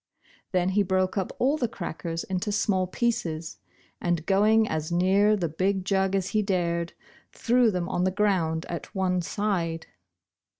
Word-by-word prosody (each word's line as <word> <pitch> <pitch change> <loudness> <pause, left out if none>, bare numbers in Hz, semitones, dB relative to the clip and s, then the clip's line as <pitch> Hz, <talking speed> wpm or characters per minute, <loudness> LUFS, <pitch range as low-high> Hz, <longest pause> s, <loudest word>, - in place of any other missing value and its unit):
Then 180 -1 +1
he 200 +2 +2
broke 185 0 0
up 195 -3 -1
all 275 +5 +2
the 245 - 0
crackers 165 -4 -5
into 190 +3 -2
small 195 -2 +1
pieces, 180 -7 -2 0.4
and 175 -2 -1
going 215 +3 +4
as 155 -2 -3
near 195 +4 +3
the 175 -4 -1
big 185 +4 -1
jug 195 -1 +1
as 195 0 -1
he 215 - +1
dared, 170 -4 -1 0.4
threw 245 0 +3
them 180 -4 -2
on 180 - -1
the 185 - +3
ground 185 -5 0
at 170 +5 -7
one 185 -1 +1
side. 170 -4 -2
185 Hz, 160 wpm, -26 LUFS, 170-205 Hz, 0.4 s, going